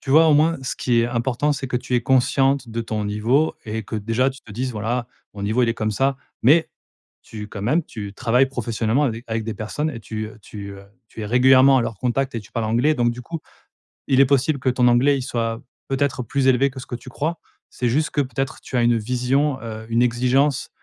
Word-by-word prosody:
tu 135 - -6
vois, 160 +3 +6
au 150 - +5
moins 160 +3 +3
ce 130 - -4
qui 120 -2 +2
est 115 - +1
important, 120 +4 0
c'est 140 - -4
que 125 - -1
tu 125 +1 -3
es 120 - +3
consciente 135 +1 +2
de 115 +1 -3
ton 110 -2 -3
niveau 115 +9 +1
et 110 0 -4
que 110 - -5
déjà 115 +5 +1
tu 135 - -13
te 105 - -13
dises: 130 +5 -2
«Voilà, 120 +3 -2 0.3
mon 100 - -7
niveau, 110 +5 +1
il 120 - +2
est 115 - 0
comme 110 -2 -1
ça». 135 +5 +1 0.3
Mais 155 +7 +4 0.5
tu 105 -2 -8
quand 100 -1 -7
même, 150 +11 +2
tu 100 -2 -8
travailles 125 +6 +2
professionnellement 120 0 -1
à 135 - +2
des 115 +2 -7
avec 110 0 -2
des 110 0 -4
personnes, 110 +9 -3
et 125 - -7
tu, 110 0 -5
heu 110 - -14
tu, 100 -1 -8
heu 100 0 -12 0.2
tu - - -10
es - - -3
régulièrement 130 +3 +6
à - - +1
leur 115 - -4
contact 130 +3 -1
et - - -2
tu 105 - -17
parles 115 -2 -1
anglais. 120 +8 +2
Donc 120 -3 +2
du 120 - -8
coup, 165 +6 -6 0.7
il 135 0 +4
est - - +7
possible 140 +2 +2
que 130 - +1
ton 125 -1 +2
anglais 130 +4 +4
il - - -3
soit 115 -1 -2 0.3
peut-être 135 -1 0
plus 135 +3 0
élevé 130 +1 +4
que 130 0 -9
ce 125 - -8
que 120 - -5
tu 120 +2 -10
crois. 155 +6 -3 0.3
C'est 125 - -2
juste 150 +6 0
que 145 - +1
peut-être 130 -1 -3
tu 130 - -4
as 120 - +3
une 120 0 +3
vision, 130 +5 0
heu, 110 -1 -7
une 115 +1 +2
exigence, 125 +3 +2
125 Hz, 250 wpm, -22 LUFS, 115-135 Hz, 0.7 s, est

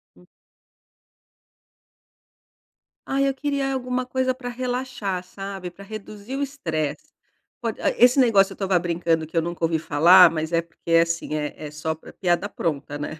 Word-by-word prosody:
Hum. - - -21 2.8
Ai, 275 +1 +1
eu 270 - 0
queria 280 -1 -1
alguma 255 -1 -2
coisa 255 0 0
pra 250 -1 -7
relaxar, 245 -6 -3
sabe, 195 -1 -7
pra 185 +3 -14
reduzir 215 +3 -8
o - - -2
estresse. 160 - -3 0.5
Pod 230 -2 -3
ai, - - +1
esse 250 +3 +6
negócio 200 -6 +4
eu - - -14
estava 190 -2 +1
brincando 165 -2 0
que 165 - -6
eu 165 - +3
nunca 170 0 -5
ouvi 165 0 +2
falar 170 +4 +7
mas 160 0 -3
é 165 - +2
porque, 170 0 -9
assim, 165 -2 +2
é 150 -1 -2
é 150 -1 -7
só 150 +1 -3
pra 160 - -14
piada 180 +2 0
pronta, 145 -5 -3
né. 150 +1 -6
185 Hz, 165 wpm, -23 LUFS, 165-250 Hz, 2.8 s, falar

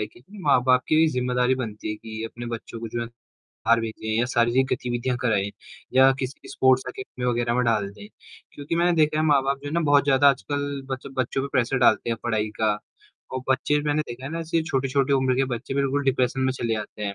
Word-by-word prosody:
है 105 - -1
कि 120 - -20 0.2
माँ-बाप 130 -3 +4
की 160 +1 +5
ज़िम्मेदारी 125 0 +1
बनती 110 -5 -5
है - - -2
कि 110 0 -8
अपने 120 +1 -7
बच्चों 115 0 -6
को 115 - -5
जो 120 +2 -3
है, 115 - -3
बाहर 115 0 -3
भेजें 110 -1 -5
या 120 - +3
शारीरिक 120 +2 +3
गतिविधियाँ 125 0 -1
कराएँ 105 -4 +1 0.4
या 130 +1 +7
किसी 130 +1 -6
स्पोर्ट्स 130 0 +3
एकेडमी 390 - -6
वगैरह 120 -1 +1
में 125 - +2
डाल 110 -4 +1
दें। 155 - -12 0.5
क्योंकि 145 +3 -4
मैंने 175 +1 +3
देखा 155 0 +1
है - - +2
माँ-बाप 140 -2 +2
जो 145 - -3
है - - -6
ना 170 - +2
बहुत 145 -3 +4
ज़्यादा 140 0 +5
आजकल 140 +3 -3
बच 130 -1 -4
बच्चों 130 +1 0
पे 140 - -3
प्रेशर 130 +1 +1
डालते 120 -1 +3
हैं 115 - 0
पढ़ाई 110 -2 0
का 105 -1 +2 0.5
और 130 - -2
बच्चे 135 +3 +2
मैंने 150 +1 +1
देखा 120 +2 -8
है 140 - -5
ना 165 - -3
सिर्फ़ 165 0 -1
छोटी-छोटी 135 +1 +1
उम्र 130 -2 +2
के 135 - +3
बच्चे 125 +3 -6
बिल्कुल 140 +1 0
डिप्रेशन 130 -1 +1
में 130 0 +1
चले 115 -3 -2
आते 105 0 -9
हैं। 100 -1 -3
130 Hz, 220 wpm, -24 LUFS, 120-140 Hz, 0.5 s, या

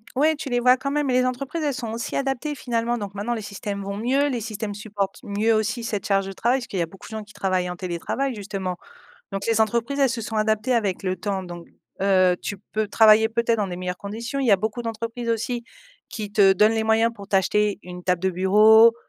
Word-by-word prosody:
Ouais 310 +4 +3
tu 290 -2 -6
les 245 -1 +1
vois 250 +1 +5
quand 275 +2 -3
même. 295 -1 0
Les 255 0 +3
entreprises 265 +6 -3
elles 290 -2 0
sont 235 -3 -4
aussi 230 0 -4
adaptées 275 +2 -1
finalement, 240 -1 -1
donc 200 -3 -6
maintenant 210 +4 -2
les 225 - -3
systèmes 200 -1 -5
vont 200 0 -4
mieux, 265 +6 +1
les 245 -4 -2
systèmes 215 -1 -4
supportent 205 -2 -4
mieux 215 +2 +1
aussi 220 +2 0
cette 210 -4 -3
charge 195 -1 +2
de 195 - -5
travail, 240 +7 +1
parce 250 - -8
qu'il 190 - -4
y - - +2
a 170 - +1
beaucoup 190 +4 -14
de - - -13
gens 215 - -5
qui 215 +1 -17
travaillent 185 -2 -1
en 180 - -4
télétravail 185 +10 -3
justement 195 -3 -4 0.5
donc 195 -1 -4
les 225 -1 +2
entreprises, 235 +5 0
elles 275 -2 +4
se 235 -1 -3
sont 220 +1 -4
adaptées 215 +3 +1
avec 205 -6 0
le 185 -1 0
temps, 190 +1 -3
donc 175 -1 -9 0.3
heu, 185 -2 +4
tu 205 - -4 0.2
peux 215 -1 -1
travailler 220 +1 +6
peut-être 230 0 +1
dans 205 - 0
des 175 - -5
meilleures 180 0 -4
conditions. 230 +6 -5
Il 265 - 0
y 230 - +4
a 200 - +7
beaucoup 220 +5 -3
d'entreprises 230 +1 -4
aussi 230 +1 -1 0.4
qui 210 -2 -6
te 195 -2 +5
donnent 210 +3 +4
les 225 - 0
moyens 225 +1 +3
pour 200 -2 -11
t'acheter 200 +1 +2
une 180 0 -9
table 180 0 0
de 190 - +2
bureau, 215 +5 +6
215 Hz, 240 wpm, -23 LUFS, 195-235 Hz, 0.5 s, a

